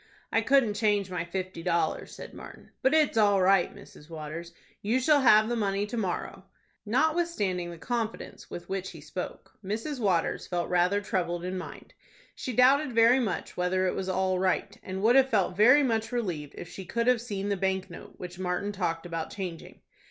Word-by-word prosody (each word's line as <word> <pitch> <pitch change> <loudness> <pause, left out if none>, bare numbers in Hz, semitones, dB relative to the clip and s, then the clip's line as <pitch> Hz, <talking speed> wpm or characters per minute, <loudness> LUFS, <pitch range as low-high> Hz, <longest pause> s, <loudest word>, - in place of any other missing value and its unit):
"I - - +3
couldn't 265 -6 +3
change 205 -3 +1
my 180 -2 -2
fifty 185 0 -5
dollars," 170 0 -1
said - - -10
Martin; - - -12
"but 265 +4 +3
it's 300 -7 +3
all 205 -2 +4
right, 190 -1 +4
Mrs. 150 - -15
Waters. 160 +1 -7 0.3
You 225 +5 +1
shall 290 +2 +4
have 215 -4 +6
the 240 - -1
money 200 -2 0
to 210 - -6
morrow." 190 -2 -3 0.4
Notwithstanding 250 - 0
the 170 - -8
confidence 230 +4 -4
with 175 - -8
which 190 -1 -3
he 165 - -10
spoke, 155 +5 -8
Mrs. 225 +9 -3
Waters 185 -7 0
felt 175 -1 -2
rather 180 +3 +3
troubled 175 -3 -2
in 185 +1 -3
mind. 185 - -8 0.4
She 255 - -5
doubted 260 +3 +4
very 230 +3 +5
much 220 -7 -3
whether 185 +1 +1
it 185 - +1
was 190 0 -3
all 185 0 +1
right, 190 +2 0
and 190 +1 -5
would 235 +3 +5
have 265 0 +5
felt 195 -5 +1
very 250 +9 +6
much 225 -3 0
relieved 175 -12 -3
if 175 - -7
she 190 - -8
could 235 +6 -2
have 250 -2 +3
seen 205 -4 -4
the 200 - +1
bank 190 0 -1
note 175 - -11
which 180 0 -8
Martin 185 +2 -2
talked 175 -4 -2
about 165 -2 -4
changing. 180 -5 -7
195 Hz, 190 wpm, -28 LUFS, 180-230 Hz, 0.4 s, have